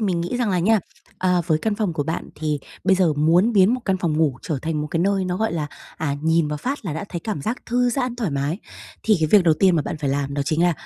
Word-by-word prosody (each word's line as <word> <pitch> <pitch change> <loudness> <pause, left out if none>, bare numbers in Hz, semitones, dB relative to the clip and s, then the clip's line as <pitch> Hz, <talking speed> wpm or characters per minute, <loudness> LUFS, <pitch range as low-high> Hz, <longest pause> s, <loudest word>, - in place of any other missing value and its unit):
mình 185 -5 0
nghĩ 175 +8 -2
rằng 240 -4 0
là 185 - +1
nha, 210 +5 +3 0.4
ờ, 180 -1 +2
với 155 -3 +2
căn 215 +5 -1
phòng 205 -4 -1
của 155 -2 -1
bạn 160 - -4
thì 150 -1 -2 0.3
bây 190 - +5
giờ 175 -5 +3
muốn 170 +10 +3
biến 200 +3 +5
một 255 - -4
căn 190 -2 +1
phòng 165 -4 -1
ngủ 145 -5 +1
trở 155 -5 -2
thành 160 -2 -1
một 150 - -2
cái 165 - 0
nơi 195 +1 +1
nó, 180 0 -2
gọi 220 -1 0
là, 155 -3 -2 0.3
à, 145 -3 -1
nhìn 160 -1 +2
vào 150 - -2
phát 265 - -3
là 170 - -3
đã 160 +6 -4
thấy 170 - -5
cảm 185 -7 -4
giác 230 - -4
thư 245 0 +2
giãn, 250 -1 -2
thoải 225 -8 -1
mái, 140 +5 -1 0.4
thì 215 -2 +3
cái 155 - +3
việc 200 -4 +6
đầu 165 -2 +5
tiên 185 +2 +3
mà 155 - +1
bạn 155 - -4
phải 145 -3 -1
làm 140 0 -2
đó 145 - 0
chính 155 +3 +1
là, 175 - +4
175 Hz, 295 wpm, -22 LUFS, 155-205 Hz, 0.4 s, việc